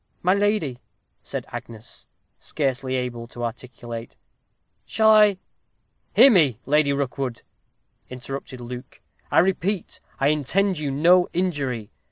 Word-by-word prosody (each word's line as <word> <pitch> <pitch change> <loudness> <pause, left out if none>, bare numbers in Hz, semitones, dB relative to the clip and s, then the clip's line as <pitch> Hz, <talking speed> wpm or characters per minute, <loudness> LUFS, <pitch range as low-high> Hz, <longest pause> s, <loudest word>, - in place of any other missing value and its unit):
"My 180 +1 +4
lady," 200 - 0 0.4
said - - -6
Agnes, 115 0 -10 0.3
scarcely 135 -2 -2
able 120 -2 -4
to 120 0 -8
articulate, 120 -1 -7 0.7
"shall 220 0 +3
I 210 -2 +6 0.4
" - - -47
"Hear 275 - +8
me, 150 - +4
Lady 150 +1 +3
Rookwood," 135 -3 -3 0.7
interrupted 130 +1 -7
Luke. 125 +2 -9 0.3
"I - - 0
repeat, 190 +2 +1 0.2
I 140 - +3
intend 175 +5 +1
you 150 -2 -2
no 175 +6 +4
injury. 140 - -2
140 Hz, 120 wpm, -23 LUFS, 125-180 Hz, 0.7 s, Hear